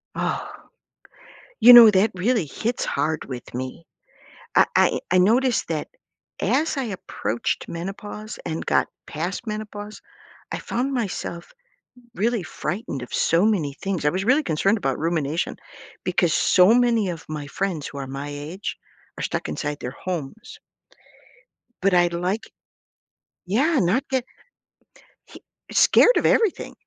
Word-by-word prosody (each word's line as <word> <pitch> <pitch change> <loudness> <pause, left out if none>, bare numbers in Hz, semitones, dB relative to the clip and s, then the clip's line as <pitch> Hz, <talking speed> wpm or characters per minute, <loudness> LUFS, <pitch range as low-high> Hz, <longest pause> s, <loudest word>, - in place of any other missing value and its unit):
Oh, - - -2 1.1
you 245 +2 +10
know, 235 -3 +11
that 200 +2 +3
really 210 +1 +1
hits 225 - -3
hard 155 +1 -1
with 125 -2 -8
me. 130 +6 -6 0.7
I - - +7
I - - +3
I 185 - +5
noticed 240 +6 +3
that - - -3 0.5
as 315 0 +1
I 270 -2 -2
approached 120 - -3
menopause 205 +5 -7
and 160 -1 -4
got - - +2 0.2
past 175 +9 -4
menopause, 210 -1 -6 0.5
I - - -2
found 265 +3 -2
myself 190 -7 -4 0.6
really 230 +1 0
frightened 175 - -4
of 125 - -8
so 170 +6 +3
many 170 -10 +1
things, 185 +2 -4
I 150 - +4
was 190 +4 -3
really 270 +6 +4
concerned 195 - +1
about 135 -9 -1
rumination 160 0 -1 0.5
because - - +1
so 185 +4 +5
many 235 -4 +3
of 165 -3 -5
my 150 -2 -5
friends 160 0 -3
who - - -9
are 135 -1 -5
my 140 +2 -6
age 150 +7 -6 0.4
are - - -4
stuck - - -3
inside 150 -1 -4
their 125 - -5
homes. 185 - -5 1.2
But 195 0 +3
I'd 175 -1 +3
like 180 +5 -2 1.0
Yeah, 275 - +2
not 225 +11 +1
get 260 -2 0 1.0
hi - - -12 0.3
scared - - +6
of - - +1
everything. 440 -6 +2
190 Hz, 140 wpm, -23 LUFS, 155-225 Hz, 1.2 s, know